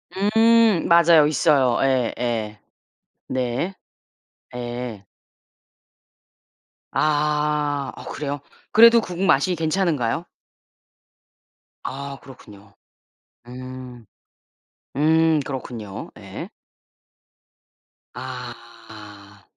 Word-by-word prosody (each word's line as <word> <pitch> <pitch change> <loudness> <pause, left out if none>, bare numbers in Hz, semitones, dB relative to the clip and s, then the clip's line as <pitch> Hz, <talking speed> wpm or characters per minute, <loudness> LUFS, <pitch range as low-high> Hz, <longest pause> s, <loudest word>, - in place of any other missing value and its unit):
음 225 0 +4
맞아요. 170 -3 +6
있어요. 140 -5 +3
예예. 120 -4 -1 0.7
네. 130 +8 -2 0.8
네. 120 -3 -6 1.9
아. 150 -1 0
어 - - -10
그래요? 145 -1 -4 0.3
그래도 230 +1 +7
국 180 -3 -6
맛이 180 +1 +3
괜찮은가요? 160 -3 -1 1.6
아 140 +1 -6
그렇군요. 105 -6 -15 0.7
음. 125 -1 -9 0.9
음. 160 +1 +3
그렇군요. 120 -7 -7
예. - - -8 1.7
아. 115 -5 -10
135 Hz, 125 characters per minute, -22 LUFS, 120-160 Hz, 1.9 s, 그래도